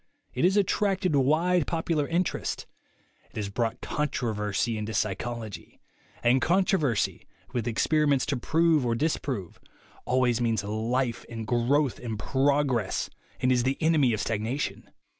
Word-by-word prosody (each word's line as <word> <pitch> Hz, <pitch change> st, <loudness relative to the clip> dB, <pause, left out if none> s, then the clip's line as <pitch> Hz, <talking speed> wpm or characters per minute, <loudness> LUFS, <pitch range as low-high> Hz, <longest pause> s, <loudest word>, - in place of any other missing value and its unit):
It -, -, +1 dB
has 190 Hz, +3 st, +3 dB
attracted 195 Hz, -4 st, +1 dB
wide 160 Hz, +5 st, +3 dB
popular 160 Hz, -3 st, 0 dB
interest. 175 Hz, +2 st, -1 dB, 0.6 s
It -, -, -26 dB
has 105 Hz, -2 st, -3 dB
brought 115 Hz, +2 st, -2 dB
controversy 115 Hz, -6 st, -1 dB
into 110 Hz, 0 st, -4 dB
psychology; 110 Hz, +1 st, -4 dB, 0.4 s
and 125 Hz, +2 st, +4 dB
contro 190 Hz, +2 st, +3 dB
versy, 120 Hz, -9 st, -1 dB, 0.3 s
with 120 Hz, -2 st, -1 dB
experiments 145 Hz, +4 st, +2 dB
to 145 Hz, -2 st, -1 dB
prove 160 Hz, +3 st, +2 dB
or 120 Hz, -1 st, +1 dB
disprove, 130 Hz, -, -2 dB, 0.5 s
always 125 Hz, -2 st, +2 dB
means 115 Hz, -3 st, +1 dB
life 115 Hz, +4 st, -1 dB
and 115 Hz, -1 st, -5 dB
growth 125 Hz, +4 st, +1 dB
and 115 Hz, -3 st, -4 dB
progress, 135 Hz, -3 st, +1 dB, 0.3 s
and 130 Hz, -, +3 dB
is 125 Hz, -1 st, +3 dB
the 130 Hz, +3 st, 0 dB
enemy 155 Hz, -6 st, +3 dB
of 110 Hz, -1 st, -1 dB
stagnation. 115 Hz, +6 st, -3 dB
130 Hz, 135 wpm, -27 LUFS, 115-155 Hz, 0.6 s, and